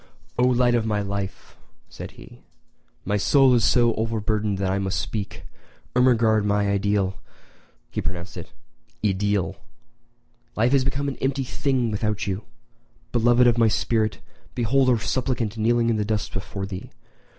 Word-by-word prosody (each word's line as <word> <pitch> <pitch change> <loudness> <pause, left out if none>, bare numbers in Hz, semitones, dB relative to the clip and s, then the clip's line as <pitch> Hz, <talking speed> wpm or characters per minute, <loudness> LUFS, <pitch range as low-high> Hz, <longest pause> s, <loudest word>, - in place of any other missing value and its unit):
"O 125 - +5
light 125 -1 +3
of 120 -2 +2
my 105 -2 -1
life," 100 -1 -5 0.3
said - - -9
he, - - -14 0.6
"my 105 +2 +1
soul 135 +5 +5
is 120 -2 +3
so 120 0 +4
overburdened 110 -2 -1
that 95 -1 0
I 100 - 0
must 95 -1 -1
speak! 105 -3 -5 0.5
Ermengarde, 115 -4 +4
my 105 0 +1
ideal 100 -1 0 0.7
[he - - -2
pronounced 90 0 -5
it 85 - -8 0.5
i 105 - +4
deel!], 100 -1 -1 1.0
life 115 +3 +2
has 135 -2 +4
become 135 +2 -1
an 140 - -3
empty 135 0 -1
thing 130 -2 -1
without 105 0 -1
you. 100 +2 -3 0.7
Beloved 120 +1 +4
of 120 -1 +4
my 115 - +5
spirit, 110 0 0 0.4
behold 130 +3 +2
a 120 - +4
suppliant 120 -2 -1
kneeling 115 +1 +2
in 110 - 0
the 105 - 0
dust 105 0 -2
before 95 +1 -4
thee. 95 -1 -7
110 Hz, 155 wpm, -24 LUFS, 100-120 Hz, 1.0 s, O